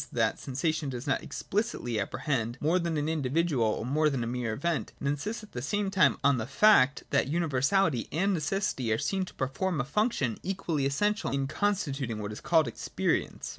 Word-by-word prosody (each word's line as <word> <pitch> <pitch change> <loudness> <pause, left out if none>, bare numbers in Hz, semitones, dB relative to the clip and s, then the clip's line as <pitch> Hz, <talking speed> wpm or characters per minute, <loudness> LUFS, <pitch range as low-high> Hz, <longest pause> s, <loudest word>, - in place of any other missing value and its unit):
that - - +1
sensation 150 +3 -1
does 125 -1 -5
not 135 - +1
expHcitly 190 - -2
apprehend 120 +2 -2
more 165 +5 +2
than 170 -2 -1
an 150 0 -1
individual 150 -5 +1
^ - - -6
or - - -4
more 150 +4 +2
than 135 -4 -1
a - - -2
mere 120 -1 -2
event, 160 +8 -2
it - - -6
insists 175 +12 -2
at 215 - -13
the 120 - -5
same 200 +8 -1
time 195 -2 +4
on 140 -3 +4
the 110 - -3
fact 150 -10 +5
that 140 -1 +2
universahty 160 - +1
and 195 +6 +1
necessity 155 - -1
are 110 - +2
seen 190 - -1
to - - -12
perform 150 +6 -1
a 125 - 0
function 150 - 0
equally 170 -7 -1
essential 210 +10 0
in 135 0 0
constituting 140 - -1
what 105 0 -4
is 105 - -8
called 160 -5 +3
experience. 115 - -2
145 Hz, 195 wpm, -29 LUFS, 130-185 Hz, -, fact